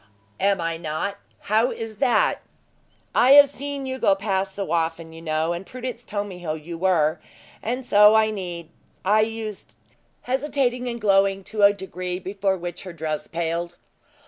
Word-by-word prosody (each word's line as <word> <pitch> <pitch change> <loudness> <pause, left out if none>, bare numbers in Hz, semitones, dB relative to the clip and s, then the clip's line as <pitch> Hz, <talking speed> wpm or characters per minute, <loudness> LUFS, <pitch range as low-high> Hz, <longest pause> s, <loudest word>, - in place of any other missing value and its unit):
"Am 195 -1 +2
I 165 -1 -2
not? 165 +5 -3 0.2
How 220 +4 +2
is 225 -2 -6
that!" 275 - +2 0.7
"I 255 +3 +6
have 285 0 +9
seen 280 0 -5
you 260 0 -4
go 195 - +4
past 195 -1 -2
so 195 -5 -4
often, 165 -1 -1
you 165 - -10
know; 160 +1 0
and 175 +2 -5
Prudence 250 +2 -6
told 205 -3 -3
me 185 -3 -9
who 160 -3 -3
you 160 +2 -8
were; 165 -3 +2 0.4
and 250 +3 -3
so 210 -1 +6
I 220 0 +4
need 175 -5 -6 0.4
I 210 +3 +4
used 220 -2 -4 0.3
" - - -42
hesitating 255 -1 0
and 235 -1 -4
glowing 195 -2 +3
to 215 +2 -4
a 200 0 +8
degree 185 -2 -5
before 190 +1 -1
which 175 -1 -6
her 185 -2 -8
dress 155 -2 -4
paled. 170 +1 -3
195 Hz, 170 wpm, -24 LUFS, 170-225 Hz, 0.7 s, have